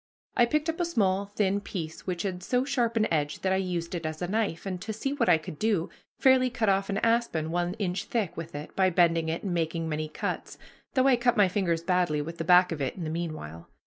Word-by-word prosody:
I 240 - +5
picked 305 +5 0
up 325 +1 -2
a - - +2
small 200 - +1
thin 200 -1 0
piece 165 -5 -6
which 175 -2 -2
had 185 -3 -3
so 250 +7 0
sharp 240 -5 0
an 215 - +3
edge 145 -2 -1
that 190 0 +1
I - - +2
used 180 -3 -2
it 170 -2 -3
as 155 0 -4
a 175 - -2
knife, 205 -4 -1
and, 185 -2 -4
to 220 - -4
see 245 +6 -2
what 255 -8 +1
I 170 - +7
could 155 -1 -9
do, 210 -6 0 0.3
fairly 260 -1 +5
cut 230 -4 0
off 195 0 +1
an 200 - -1
aspen 230 -9 +1
one 175 +1 -1
inch 195 -4 -2
thick 220 -7 -2
with 165 -2 -7
it, 150 +1 -7
by 190 -1 +4
bending 165 -2 +3
it 165 - -3
and 190 -3 -2
making 165 -1 -1
many 155 0 -2
cuts; - - -4 0.4
though 260 0 +4
I 260 -2 +5
cut 240 -1 +2
my 205 -2 +6
fingers 175 -3 0
badly 175 -4 +1
with 165 +3 -5
the - - -1
back 180 +2 +6
of 155 -3 -3
it 135 - -2
in 180 - -6
the 155 - -3
meanwhile. 155 - -5
180 Hz, 250 wpm, -28 LUFS, 165-220 Hz, 0.4 s, I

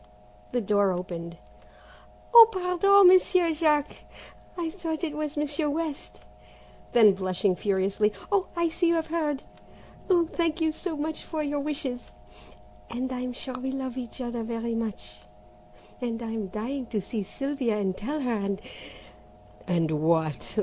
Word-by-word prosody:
The 245 - 0
door 205 -2 +2
opened. 175 -2 -5 1.0
"Oh, 460 -1 +11
pardon, 375 +1 +5
Monsieur 360 -2 +5
Jack, 300 -2 +1 0.6
I 335 -2 -2
thought 330 -2 -4
it 305 -3 -2
was 305 -1 -4
Monsieur 295 +1 -1
West," 285 - -4 0.7
then 220 -4 +7
blushing 185 0 0
furiously, 200 +2 +1 0.2
"Oh, 400 -2 +2
I 340 -1 +1
see 345 +2 0
you 335 - +3
have 325 -1 0
heard! 305 -4 -2 0.7
Oh, 350 -3 +4
thank 330 0 -1
you 320 -1 +2
so 320 0 -5
much 310 +2 -3
for 315 -2 -3
your 290 0 -1
wishes, 280 -4 -4 0.8
and 255 +2 -3
I'm 250 0 -3
sure 260 +1 -5
we 255 +1 -4
love 265 -2 -4
each 255 0 -7
other 240 -1 -3
very 230 0 -3
much, 200 - -4 0.8
and 235 -2 -2
I'm 225 -3 -3
dying 240 +7 -4
to 220 - -2
see 210 +3 -4
Sylvia 260 +1 -2
and 190 -3 -1
tell 290 +10 -3
her 250 -3 0
and 200 -2 -2 0.6
" 105 0 -25
"And 165 -3 +1
what?" 155 - 0
255 Hz, 150 wpm, -27 LUFS, 200-315 Hz, 1.0 s, Oh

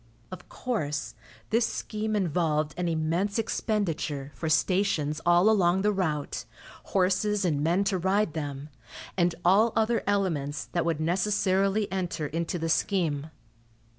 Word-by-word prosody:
Of 180 -1 -10
course, 145 - -3 0.4
this 230 +1 +3
scheme 215 0 -3
involved 155 -5 0
an 175 0 -2
immense 170 +6 0
expenditure 165 -11 -2
for 160 - -4
stations 160 -3 +1
all 175 +3 +5
along 190 -3 +3
the 210 - +3
route, 160 -7 -2 0.4
horses 195 +2 +1
and 150 -5 +1
men 175 +5 +2
to 195 -2 0
ride 190 -1 +1
them, 145 -2 -5 0.5
and 175 -2 +2
all 210 +6 +5
other 225 +1 +2
elements 165 -8 0
that 170 -1 0
would 165 -3 0
necessarily 195 +3 +1
enter 180 -5 -2
into 165 +4 -2
the 165 -1 -2
scheme. 160 -4 0
180 Hz, 135 wpm, -27 LUFS, 155-200 Hz, 0.5 s, all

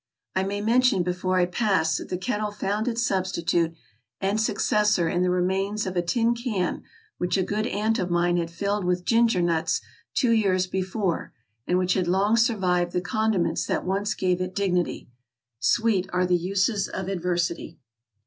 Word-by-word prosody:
I 190 - +2
may 200 +2 -2
mention 240 -2 +3
before 180 +1 -1
I 180 - +4
pass 180 -4 +1
that - - -7
the 180 - -2
kettle 210 +2 -2
found 205 +2 -2
its 235 0 0
substitute 170 -4 0 0.4
and 200 +3 0
successor 210 -4 +2
in 175 +2 0
the 180 - +2
remains 190 +3 0
of 185 -1 -4
a 175 - +2
tin 230 +7 +1
can 230 -7 -2 0.4
which 180 +2 0
a 190 - +2
good 215 +4 -1
aunt 220 +1 0
of 180 - -1
mine 175 0 +2
had 170 -1 -1
filled 200 +4 -2
with 180 0 -1
ginger 230 -6 +3
nuts 165 -2 +1 0.4
two 245 -4 +3
years 195 -5 +2
be 190 +1 -2
fore, 185 -2 -2 0.3
and 180 - +2
which 185 0 +2
had 185 -2 0
long 195 +5 +3
survived 185 -7 +1
the - - +1
condiments 215 -1 0
that - - -1
once 200 +3 -1
gave 180 -1 0
it 185 0 -4
dignity. 180 -3 -1 0.3
" 115 0 -62
Sweet 195 - +2
are 180 0 +1
the 180 0 +2
uses 195 +4 0
of 190 -1 -5
adversity. 175 -3 -2
190 Hz, 180 wpm, -25 LUFS, 180-210 Hz, 0.4 s, I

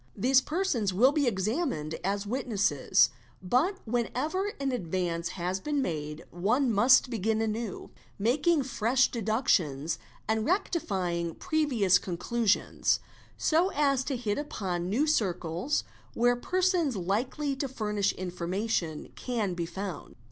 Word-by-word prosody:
'These 260 +5 +4
persons 300 - 0
will 240 +9 +5
be 290 -3 +1
examined 200 - -1
as 200 +2 -1
witnesses, 205 - +2 0.3
but 260 - +1
whenever 255 - -1
an 275 -1 0
% 165 - -10
dvance 170 -2 -1
has 180 +1 -3
been 295 +7 -1
made 155 - -3
one 230 +8 +1
must 250 +5 +5
begin 220 0 0
anew, 220 -1 -3 0.3
making 285 +8 +2
fresh 250 0 +2
deductions 195 - 0 0.3
and 220 0 +1
rectifying 190 - -1
previous 270 - +2
conclusions, 205 +4 0 0.4
so 340 +4 +2
as 275 -3 +2
to 270 -2 -2
hit 225 0 -1
upon 185 -11 -3
new 250 +10 +2
circles 185 - 0 0.3
where 245 +1 +3
persons 360 - +1
likely 250 - -1
to 275 +1 -2
furnish 210 -5 0
information 180 -1 -3
can 225 -7 -2
be 170 -1 -3
found. 190 -1 -6
220 Hz, 125 wpm, -29 LUFS, 185-270 Hz, 0.4 s, will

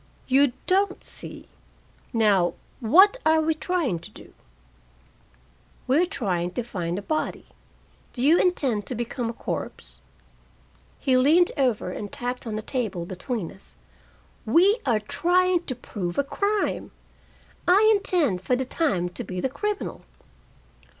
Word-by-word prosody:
"You 270 0 +4
don't 385 +1 +1
see. - - -8 0.6
Now, 205 -6 +3 0.2
what 375 - +6
are 315 0 +4
we 320 0 +2
trying 315 - -1
to - - -11
do?" - - -15 1.5
"We're 305 +8 +3
trying 180 - -2
to 245 - -2
find 180 -6 -3
a 200 - -5
body. 310 +7 -2 0.7
Do 245 - -4
you 315 +5 +5
intend 265 - +1
to 250 - -3
become 240 +1 -3
a - - -4
corpse?" - - -6 1.0
He 260 - +2
leaned 315 +7 +4
over 245 -9 0
and 205 +2 -6
tapped 245 0 -4
on 215 - -3
the 215 - -4
table 215 -9 -2
between 185 +1 -4
us. 65 - -16 0.7
"We 370 - +4
are 230 -4 +3
trying 355 - +1
to 255 - -3
prove 190 -7 -5
a 280 - +3
crime. 405 +8 -1 0.8
I 395 +5 +6
intend 325 - +1
for 250 +7 +1
the 260 +1 -2
time 215 - 0
to 175 - -6
be 185 -1 -5
the 265 - 0
criminal." 415 +10 -3
255 Hz, 140 wpm, -25 LUFS, 210-345 Hz, 1.5 s, what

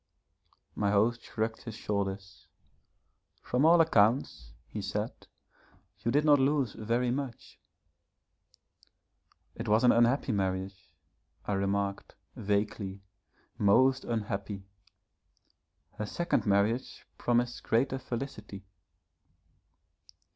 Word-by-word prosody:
My 100 -1 0
host 110 +4 +2
shrugged 110 0 -3
his 115 -3 -8
shoulders. 100 -2 -4 1.0
'From 125 +4 +1
all 170 +1 +7
accounts,' 110 - +2 0.2
he 105 - -5
said, 105 +3 -2 0.9
'you 115 - -2
did 145 +5 +2
not 145 -2 +6
lose 135 -3 +1
very 120 +3 0
much.' 130 -2 -5 1.9
'It 115 - -6
was 110 +3 +3
an 125 - +7
unhappy 120 +3 +3
marriage,' 95 -3 -3 0.5
I 105 - -1
remarked, 100 0 -2 0.2
vaguely, 100 -1 -2 0.6
'most 130 +6 +4
unhappy. 100 -3 -3 1.3
Her 105 - -2
second 170 -1 -1
marriage 105 +5 0
promised 120 0 0
greater 130 +3 +1
felicity.' 115 -6 -6
110 Hz, 95 wpm, -30 LUFS, 100-125 Hz, 1.9 s, all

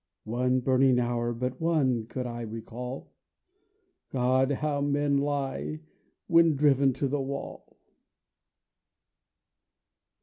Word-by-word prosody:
(One 125 +3 0
burning 130 0 +3
hour, 120 -1 0
but 125 +5 -4
one, 135 -9 +1
could 125 +1 -4
I 120 -1 -5
recall; 115 +3 -7 1.0
God, 130 +1 +2
how 145 +1 -1
men 145 0 +1
lie 145 +2 -2 0.4
when 165 -2 +4
driven 140 -1 +4
to 140 +2 -1
the 140 +1 -1
wall!) 140 +1 -7
130 Hz, 100 wpm, -28 LUFS, 125-145 Hz, 1.0 s, when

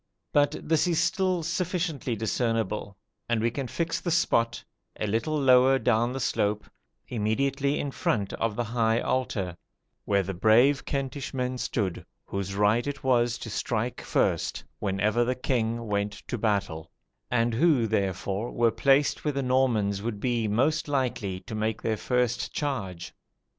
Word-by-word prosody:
But 145 0 +3
this 160 +2 +3
is 170 -3 +2
still 185 -4 +1
sufficiently 170 -7 -2
discernible; 110 -2 -1 0.3
and 120 -1 +2
we 115 +1 +1
can 135 +1 -4
fix 165 +5 -2
the 175 - -2
spot, 120 -8 +1 0.4
a - - 0
little 115 +9 0
lower 130 0 +5
down 120 -1 +2
the 135 - -4
slope, 105 -4 0 0.4
immediately 135 +6 0
in 140 - -2
front 100 -6 -1
of 115 -2 -1
the 120 - 0
high 115 -1 +1
altar, 100 -10 -1 0.5
where 100 -1 +2
the 95 +1 -4
brave 120 +9 +4
Kentish 140 0 -3
men 125 0 -2
stood, 100 -9 -2 0.2
"whose 100 0 -4
right 105 +5 +2
it 145 0 -5
was 120 -2 +2
to 115 - -7
strike 115 +3 -2
first - - 0 0.2
when 95 -1 -2
ever 110 +4 +2
the 125 +2 0
king 115 -2 -1
went 100 -1 -1 0.2
to - - -1
battle," 100 -8 -1 0.4
and 120 -1 +1
who, 140 -2 +3
therefore, 100 +1 -1
were 115 -1 +2
placed 135 +6 +2
where 150 - 0
the 140 0 -1
Normans 120 -6 +1
would 110 -1 -3
be 120 -1 0
most 140 +10 +1
likely 120 -9 -1
to 105 - -9
make 110 0 -1
their 110 -1 +1
first 125 +2 0
charge. 100 - -4
120 Hz, 160 wpm, -27 LUFS, 105-135 Hz, 0.5 s, lower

